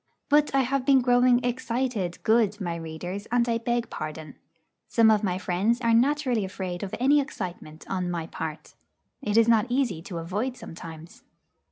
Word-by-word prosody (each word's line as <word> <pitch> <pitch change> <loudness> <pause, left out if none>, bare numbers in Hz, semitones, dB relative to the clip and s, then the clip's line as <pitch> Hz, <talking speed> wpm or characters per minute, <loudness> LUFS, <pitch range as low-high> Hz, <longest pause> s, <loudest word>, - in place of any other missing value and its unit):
But 295 -1 +3
I 270 - +5
have 265 +1 0
been 270 -1 +5
growing 245 0 +4
'excited,' 240 -6 -2
good 220 -2 +2
my 175 -4 -3
readers, 170 +5 -6
and 240 0 +2
I 230 -1 +1
beg 240 0 -1
pardon. 155 -1 -6 0.5
Some 225 -1 +5
of 215 -1 +2
my 185 -3 0
friends 190 +6 0
are 230 -2 +2
naturally 255 -2 +2
afraid 185 -2 -5
of 195 - -4
any 285 +4 +4
excitement 175 - -7
on 185 -2 -2
my 170 -2 -3
part. 160 -1 -7 0.5
It 210 -5 0
is 230 0 +6
not 225 -2 +4
easy 245 -10 0
to 170 0 -7
avoid 205 +10 -3
sometimes. 165 0 -10
220 Hz, 170 wpm, -26 LUFS, 175-245 Hz, 0.5 s, is